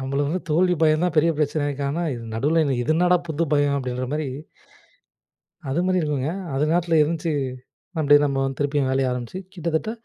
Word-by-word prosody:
நம்மளுக்கு 140 +2 -1
வந்து 185 - -1
தோல்வி 180 +3 +3
பயம் 155 +1 +3
தான், 180 - 0
பெரிய 165 +2 +4
பிரச்சனை 150 0 0
இருக்கு. 145 -1 -3
ஆனா 160 +5 -2 0.3
நடுவுல 155 +8 +2 0.2
இது 155 - +1
என்னடா 180 +2 +4
புது 160 +1 0
பயம் 145 -1 +3
அப்டின்ற 125 -1 -3
மாரி. 150 0 -1 1.4
அது 160 +6 0
மாதிரி 185 -1 +2
இல்லைங்க. 145 0 -1 0.2
அது 140 +2 +1
நேரத்துல 165 -1 +2
இருந்துச்சு, 160 +1 -1 0.7
மன்டே 145 -1 +6
நம்ம 135 -1 0
வந்து 135 0 -3
திருப்பியும் 145 -2 0
வேலைய 130 -1 +1
ஆரம்பிச்சு 125 +8 -5
கிட்டத்தட்ட 170 +3 -2
150 Hz, 175 wpm, -23 LUFS, 140-165 Hz, 1.4 s, மன்டே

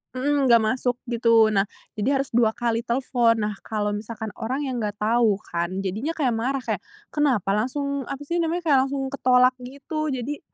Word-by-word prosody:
heeh, 285 +3 +1
enggak 235 -2 +6
masuk, 245 +2 0 0.2
gitu. 230 -2 +4
Nah 195 -1 +2 0.3
jadi 260 +7 +2
harus 275 - -7
2 230 -1 +4
kali 235 -1 0
telepon. 235 -1 +1
Nah, 210 0 -1
kalau 210 -1 -2
misalkan 220 +1 -5
orang 260 +6 -2
yang 255 -3 -3
enggak 210 -1 -2
tahu 220 0 +3 0.2
kan, 175 +3 -2
jadinya 220 - -2
kayak 270 -6 +2
marah, 255 +4 -1
kayak, - - -2 0.3
"Kenapa 260 -10 +1
langsung 275 +5 -2
apa 275 - -3
sih 340 +4 -1
namanya 335 +2 -1
kayak 285 -4 +5
langsung 275 0 -3
ketolak," 255 -2 +4
gitu. 280 +5 -4
Jadi 270 +2 -3
245 Hz, 180 wpm, -24 LUFS, 220-275 Hz, 0.3 s, enggak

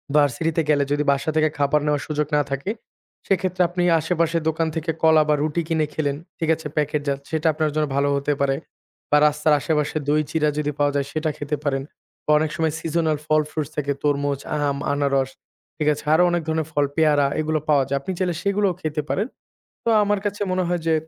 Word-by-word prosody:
ভার্সিটিতে 150 +3 +2
গেলে 145 -2 +4
যদি 145 0 +2
বাসা 140 +3 -1
থেকে 155 0 +3
খাবার 145 +1 +2
নেওয়ার 150 -1 0
সুযোগ 150 -1 -1
না 150 - +4
থাকে, 140 +8 -2 0.6
সেক্ষেত্রে 185 -2 0
আপনি 175 0 -1 0.2
আশেপাশের 165 0 0
দোকান 160 +1 0
থেকে 160 0 -1
কলা 160 -1 +6
বা - - +5
রুটি 155 +3 0
কিনে 160 -2 +1
খেলেন। 145 -2 -1 0.2
ঠিক 165 -1 -1
আছে? 160 -1 -7
প্যাকেট 150 0 0
জাত, 140 -1 0
সেটা 160 0 0
আপনার 155 0 0
জন্য 155 -1 +2
ভালো 140 +1 +2
হতে 140 +1 0
পারে 135 -1 +2 0.6
বা 150 - +6
রাস্তার 150 +1 +2
আশেপাশে 150 +1 0
দই 150 +1 +3
চিড়া 155 -2 +1
যদি 150 -1 0
পাওয়া 145 0 +3
যায়, 140 -1 +1
সেটা 155 0 -1
খেতে 145 +1 -3
পারেন 135 -2 0 0.4
বা - - +1
অনেক 155 0 0
সময় 160 -1 0
সিজনাল 160 -1 0
ফল 155 0 +3
ফ্রুইট 155 -1 -4 0.3
তরমুজ, 145 -1 0 0.2
আম, 140 -1 0 0.2
আনারস, 140 -2 +1 0.5
ঠিক 150 -1 -1
আছে। 150 +1 -8
আরও 175 +3 +5
অনেক 175 0 +1
ধরনের 160 -1 -1
ফল, 145 -2 +2
পেয়ারা 150 -3 +4
এগুলো 155 0 0
পাওয়া 145 -2 +5
যায়। 140 - 0
আপনি 190 - -4
চাইলে 180 -3 0
সেগুলোও 200 -2 +1
খেতে 155 -2 -2
পারেন। 205 +4 0 0.6
তো - - -1
আমার 205 0 +1
কাছে 205 0 -2
মনে 185 0 +1
হয় 175 -1 0
যে, 160 - +4
155 Hz, 200 wpm, -22 LUFS, 145-160 Hz, 0.6 s, কলা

